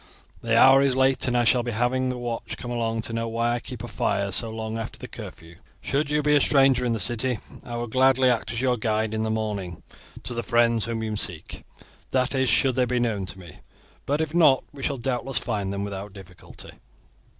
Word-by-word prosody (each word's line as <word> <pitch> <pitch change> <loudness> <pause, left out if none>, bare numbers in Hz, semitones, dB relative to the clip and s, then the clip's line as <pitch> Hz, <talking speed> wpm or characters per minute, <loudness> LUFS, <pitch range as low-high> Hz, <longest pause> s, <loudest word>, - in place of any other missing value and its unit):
The 115 0 +1
hour 135 +3 +7
is 135 -2 +2
late, 130 0 +2
and 125 0 +1
I 120 - +3
shall 120 +1 +3
be 120 - -4
having 125 +3 0
the 125 - -3
watch 120 -1 -5
coming 120 0 -5
along 115 -1 -1
to 115 - -2
know 115 0 -2
why 115 +1 0
I 120 - -1
keep 125 -2 -8
a - - -5
fire 100 0 -1
so 110 +4 0
long 110 0 -5
after 115 - -6
the - - -9
curfew. 85 +1 -11 0.2
Should 145 +2 -1
you 150 0 +1
be 150 0 +3
a 145 - +4
stranger 135 -3 +4
in 120 -2 0
the 115 - -2
city, 120 +4 +2 0.3
I 120 - -7
will 120 0 -3
gladly 130 +2 +3
act 120 -2 0
as 120 0 -3
your 125 -2 +1
guide 110 0 -1
in 110 - -1
the 110 - -1
morning 105 -6 -3 0.4
to 125 - -5
the 120 - -2
friends 115 -1 +2
whom 115 -1 -3
you 110 -1 -3
seek, 85 -6 -4 0.5
that 130 +1 0
is, 130 -2 +1
should 130 +4 +3
they 125 0 +2
be 125 0 -1
known 110 -5 -1
to 95 - -7
me; 85 -5 -13 0.5
but 145 +3 +1
if 160 -1 -3
not, 150 -6 +5
we 140 - -10
shall 140 0 -1
doubtless 125 +1 -2
find 105 -6 -2
them 100 0 -3
without 100 0 -6
difficulty." 90 -3 -12
120 Hz, 230 wpm, -25 LUFS, 110-130 Hz, 0.5 s, hour